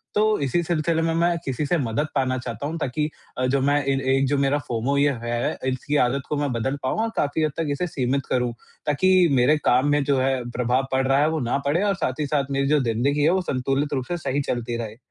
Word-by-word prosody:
तो 215 0 +3
इसी 140 +4 0
सिलसिले 165 0 0
में 165 0 0
मैं 170 +1 +2
किसी 135 +2 -2
से 175 +5 +1
मदद 125 +1 -1
पाना 130 -2 +1
चाहता 120 +1 -5
हूँ, 160 +2 -4
ताकि 150 +2 -1 0.3
अ, 130 - 0
जो 135 +2 +1
मैं 145 +1 +2
इन 135 0 +1
एक 135 0 +2
जो 145 +1 +1
मेरा 140 +1 +2
फ़ोमो 125 +4 -1
ये 145 0 +3
है 120 0 -1
इसकी 130 +3 -2
आदत 135 +2 -2
को 150 - 0
मैं 145 -2 -1
बदल 125 +4 -1
पाऊँ 130 - -1
और 230 - -1
काफ़ी 145 +2 0
हद 155 - +1
तक 165 -1 -1
इसे 180 +5 -1
सीमित 135 -3 -1
करूँ। 125 -2 0 0.3
ताकि 185 +4 +4
मेरे 135 +3 +4
काम 130 +3 +4
में 145 -1 +2
जो 140 -1 +1
है 130 -1 0
प्रभाव 125 +2 0
पड़ 130 0 +1
रहा 135 +1 +3
है 150 +2 +3
वो 160 0 -1
ना 120 -2 0
पड़े, 155 +7 +1
और 200 -1 +1
साथ 130 -5 -2
ही 150 - 0
साथ 140 -1 -1
मेरी 140 0 0
जो 150 +1 +3
ज़िंदगी 130 +6 +1
है 155 - +5
वो 185 +2 +2
संतुलित 135 -1 -1
रूप 130 -2 -1
से 175 - -1
सही 145 -3 -1
चलती 120 -3 -3
रहे। 110 -1 -6
140 Hz, 250 wpm, -23 LUFS, 130-150 Hz, 0.3 s, है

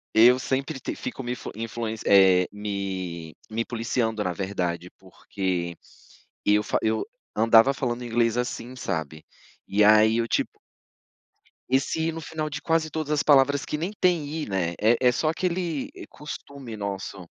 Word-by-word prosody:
Eu 120 +3 +7
sempre 135 +2 -2
te - - -4
fico 135 - -6
me 120 - -3
influ 125 - -5
influen 115 0 -4
eh, 95 -2 +6
me 95 -5 -4
me 115 +1 -2
policiando, 115 -2 -1
na 90 - -1
verdade, 90 -2 -3
porque 95 -2 -4 0.7
eu 105 0 +4
fa - - 0
eu 110 - 0 0.3
andava 115 +4 +6
falando 125 -3 -3
inglês 115 -1 +1
assim, 125 0 -3
sabe, 80 - -4 0.4
e 105 +1 +3
aí 110 +1 +6
eu 115 - +1
tipo - - -1 1.1
Esse 135 +5 +1
i - - -1
no 165 - -6
final 155 0 -4
de 145 0 -5
quase 165 0 +1
todas 155 -1 -3
as 150 -1 +2
palavras, 145 -1 +4
que 150 - -3
nem 175 +6 -3
tem 180 -6 +2 0.2
i, - - -7
né, 90 -3 -1
é 115 +3 +4
é - - +6
só 155 +5 0
aquele, 170 -3 -2
eh, - - -9
costume 140 -5 -8
nosso. 100 -2 -5
115 Hz, 160 wpm, -25 LUFS, 100-140 Hz, 1.1 s, Eu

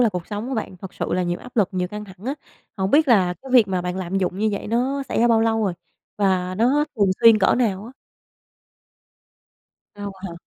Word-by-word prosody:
là 240 - +5
cuộc 180 -4 -5
sống 210 +3 -5
của 265 - -3
bạn 215 -5 -4
thật 185 +1 -10
sự - - -3
là 185 - +1
nhiều 175 0 -2
áp 250 -1 -14
lực 200 -4 +3
nhiều 180 -1 -2
căng 210 +2 -7
thẳng 190 +2 -13
á. 275 - -1 0.4
Hổng 190 0 -1
biết 310 0 +4
là 185 -7 +4
cái 265 - -10
việc 235 -6 +6
mà 185 -2 -1
bạn 180 +1 -3
lạm 190 +1 -2
dụng 185 0 -2
như 215 +1 +1
vậy 200 - -4
nó 255 +5 0
xảy - - -1
ra 240 - +4
bao 225 -1 +4
lâu 225 -1 +1
rồi? 190 - 0 0.5
Và 185 -2 +1
nó 255 +9 +2
thường 200 -3 +3
xuyên 230 -2 +8
cỡ - - +3
nào 210 -5 0
á? 240 - -11 2.0
Lâu 205 -1 -6
hả? 190 -3 -6
205 Hz, 235 wpm, -22 LUFS, 185-230 Hz, 2.0 s, xuyên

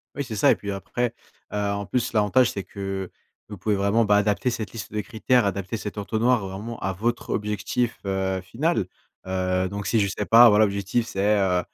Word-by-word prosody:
Oui, 140 +1 -3
c'est 115 -3 -6
ça - - +5
et - - +4
puis, 100 - -5
après, 115 +4 -2 0.4
heu, - - -1
en 100 0 -3
plus, 120 +4 -1
l'avantage, 115 +3 +3
c'est 100 - -5
que 95 -1 -5 0.4
vous 105 - -8
pouvez 105 +3 0
vraiment, 100 +4 +2
bah, 105 -1 +4
adapter 105 +4 +1
cette 110 -2 -4
liste 105 -7 -7
de 105 - -2
critères, 115 +2 +1
adapter 100 +2 -2
cet 105 -1 -6
entonnoir, 110 +2 +1
vraiment, 105 +5 -6
à 95 - -2
votre 115 +6 -2
objectif, 105 +3 -1
heu, 95 -1 -1
final. 115 - -1 0.4
Heu, 95 0 0
donc 100 0 -5
si 115 - +2
je 100 - +1
sais 105 - -3
pas, 115 +2 +8
voilà, 105 +1 +5
l'objectif 100 +3 -1
c'est, 105 +1 +1
heu 90 -2 +2
105 Hz, 205 wpm, -24 LUFS, 95-115 Hz, 0.4 s, pas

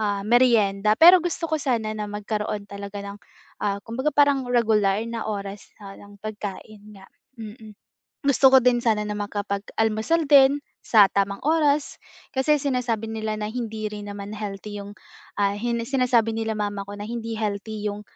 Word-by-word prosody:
ah, 205 -2 -1
meryenda. 215 -3 +3
Pero 350 +2 +9
gusto 340 0 -3
ko 315 - +3
sana 225 -5 -1
na 210 -1 -5
magkaroon 210 0 -4
talaga 200 0 -7
ng, 200 +1 -8 0.4
ah, 200 -1 0
kumbaga 260 +6 -2
parang 285 -3 +3
regular 215 -4 +2
na 230 -1 -5
oras 200 -1 -6 0.2
ng 200 +1 -12
pagkain 210 0 -8
nga, 190 - -15 0.3
mm. 215 -1 -10 0.5
Gusto 270 0 +5
ko 265 - +9
din 245 -1 +3
sana 215 -2 +1
na 210 - -3
makapag-almusal 215 +8 -1
din 280 0 +6 0.2
sa 215 -3 +6
tamang 200 0 0
oras, 300 -2 +1 0.4
kasi 295 +3 +2
sinasabi 250 -5 -1
nila 220 -1 -3
na 210 0 -3
hindi 220 -3 -4
rin 210 -1 -8
naman 200 +1 -7
healthy 205 0 -6
yung, 200 +1 -10 0.5
ah, 200 0 +2
hin 235 +2 -1
sinasabi 245 -4 +1
nila 225 0 -2
mama 205 -1 -3
ko 205 - -6
na 205 - -6
hindi 230 -1 -5
healthy 210 0 -4
yung, 205 +1 -6
215 Hz, 160 wpm, -24 LUFS, 205-240 Hz, 0.5 s, Pero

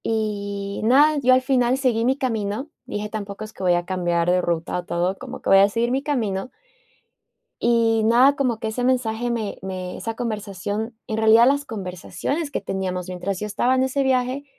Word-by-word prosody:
Y 200 -2 -2
nada, 290 +6 +5
yo 255 0 +5
al 255 0 +3
final 255 -1 +2
seguí 240 -4 +1
mi 260 +2 +2
camino, 230 +2 -2
dije, 210 -4 -4
tampoco 205 -1 -6
es 215 0 -9
que - - -12
voy 180 -2 +3
a 175 0 -1
cambiar 175 -2 0
de 180 0 +3
ruta 170 0 -2
o - - -6
todo, 175 +3 -1
como 260 0 -8
que - - -2
voy 195 - +8
a 200 +1 +5
seguir 235 +3 0
mi 265 +2 +1
camino. 235 -7 -2 1.1
Y 230 -1 +3
nada, 250 +5 +5
como 255 -5 0
que 220 - -3
ese 245 +3 -3
mensaje 245 -2 0
me 225 -4 -3
me 185 -1 -5
esa 225 0 -5
conversación 215 0 -4
En 220 - -3
realidad, 220 +1 +6
las 285 +1 +2
conversaciones 220 - -4
que - - -2
teníamos 190 -2 -3
mientras 185 +1 -4
yo 210 - -3
estaba 235 +5 +1
en 260 - +2
ese 265 +1 0
viaje, 260 +1 0
220 Hz, 195 wpm, -22 LUFS, 195-255 Hz, 1.1 s, voy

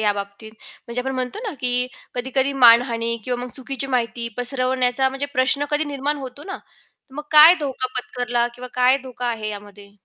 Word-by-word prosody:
या 210 -1 +2
बाबतीत? 200 +2 -8 0.3
म्हणजे 235 +1 -3
आपण 265 +1 -3
म्हणतो 255 +8 -4
ना - - -5
की 250 0 +1 0.3
कधी-कधी 265 +2 0
मानहानी 235 -2 +4
किंवा 245 -1 -3
मग 250 - -8
चुकीची 270 0 -2
माहिती 235 -2 -2
पसरवण्याचा 255 +1 +1
म्हणजे 270 +2 -4
प्रश्न 275 +3 +2
कधी 295 +1 +1
निर्माण 290 0 -2
होतो 270 0 -9
ना? 390 - -5
तर 265 - -25
मग 295 - -5
काय 310 +3 +10
धोका 265 -3 -2
पत्करला 245 -1 -1
किंवा 250 +1 -9
काय 255 +2 +4
धोका 250 -1 -6
आहे 225 -3 -2
यामध्ये? 205 -1 -10
250 Hz, 180 wpm, -21 LUFS, 235-270 Hz, 0.3 s, काय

